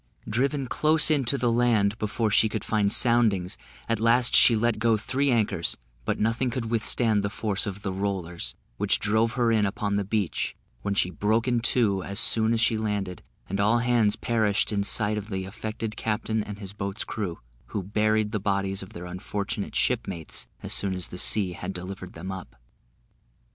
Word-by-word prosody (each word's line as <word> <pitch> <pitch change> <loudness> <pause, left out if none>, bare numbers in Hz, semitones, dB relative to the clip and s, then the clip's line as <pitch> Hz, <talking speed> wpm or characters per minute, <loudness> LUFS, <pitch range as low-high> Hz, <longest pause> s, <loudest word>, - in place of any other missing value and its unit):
Driven 135 +5 0
close 155 +4 +3
in 145 -4 +2
to 140 +4 +1
the 120 -3 +1
land 115 -4 +2
before 105 +1 -1
she 110 - +4
could 110 -2 -4
find 105 -2 +1
soundings, 110 -7 +3 0.3
at 115 -2 0
last 115 +2 +4
she 115 - +7
let 115 0 +1
go 115 0 +3
three 135 +6 0
anchors; 115 -4 +1 0.3
but - - -1
nothing 115 +4 +1
could 115 -2 -4
withstand 115 -1 +2
the 100 - -1
force 105 0 -2
of 100 0 -6
the 95 - -2
"Rollers," 90 -9 -3 0.2
which - - +1
drove 110 +2 +1
her 120 -2 +2
in 110 -2 +3
upon 100 0 -1
the 100 - 0
beach, 100 -2 -2 0.3
when 100 - -2
she 90 -2 +1
broke 110 +7 0
in 120 -1 +2
two 115 -5 +2
as 100 +3 -1
soon 110 +1 +5
as 115 - +1
she 115 0 +2
landed, 100 -4 -3 0.3
and 100 +1 -3
all 105 +4 +3
hands 120 -3 +2
perished 110 -3 0
in 100 -1 0
sight 105 +1 +1
of 105 +1 -10
the 95 -2 -3
affected 110 +2 -5
captain 110 0 -1
and 105 -1 -7
his 100 -2 -8
boat's 100 0 -4
crew, 95 -6 -4 0.3
who 100 - -4
buried 105 +2 +1
the 105 - -1
bodies 100 -1 -1
of 95 - -10
their 85 - -7
unfortunate 100 +3 -4
shipmates 95 - -2 0.2
as - - 0
soon 95 -2 0
as 90 -2 -5
the 90 - -6
sea 100 -2 +2
had 90 +2 -5
delivered 95 0 -7
them 90 +4 -6
up. 95 -7 -8
105 Hz, 190 wpm, -26 LUFS, 100-115 Hz, 0.3 s, she